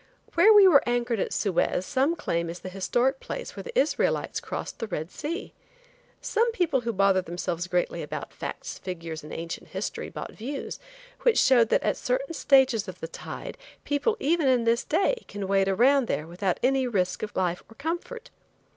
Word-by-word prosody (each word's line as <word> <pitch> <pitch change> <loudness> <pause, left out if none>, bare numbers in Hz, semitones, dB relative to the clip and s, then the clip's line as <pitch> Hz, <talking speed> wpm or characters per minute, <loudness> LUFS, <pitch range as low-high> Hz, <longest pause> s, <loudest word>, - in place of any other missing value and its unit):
Where 350 +6 +6
we 410 -2 +9 0.2
anchored 240 -2 0
at - - -1
Suez 185 -2 0
some 280 - +1
claim 170 - -2
is 170 +1 -7
the 185 - -6
historic 240 +8 0
place - - -6
where - - -5
the 480 0 -6
Israelites - - +1
crossed - - -6
the 225 - -3
Red 160 -3 -4
Sea. 335 +6 -5 0.7
Some 465 +2 +1
people 335 - +1
who 235 -1 -2
bother 195 -2 +3
themselves 175 0 -3
greatly 180 0 -1
about - - -6
facts, - - -6
figures 165 -3 -6
and 150 - -10
ancient 165 +1 -6
history, - - -4
bought - - -7
views, 270 +6 -6 0.4
which 480 -3 +3
showed 240 -4 +5
that - - +2
at - - +1
certain - - -1
stages 265 -8 +3
of 185 - -8
the 165 - -5
tide, 170 - -8 0.2
people, 290 +10 0
in - - -5 0.2
even 260 -4 +3
this 230 +1 +2
day, 400 +9 +1
can 200 -1 -5
wade 195 0 +2
around 250 +6 +4
there 150 - -1
without 175 +2 -2
any 260 0 +2
risk 185 -6 0
of 215 - -5
life 180 -1 0
or 225 - -15
comfort. 345 - -5
235 Hz, 180 wpm, -27 LUFS, 185-290 Hz, 0.7 s, we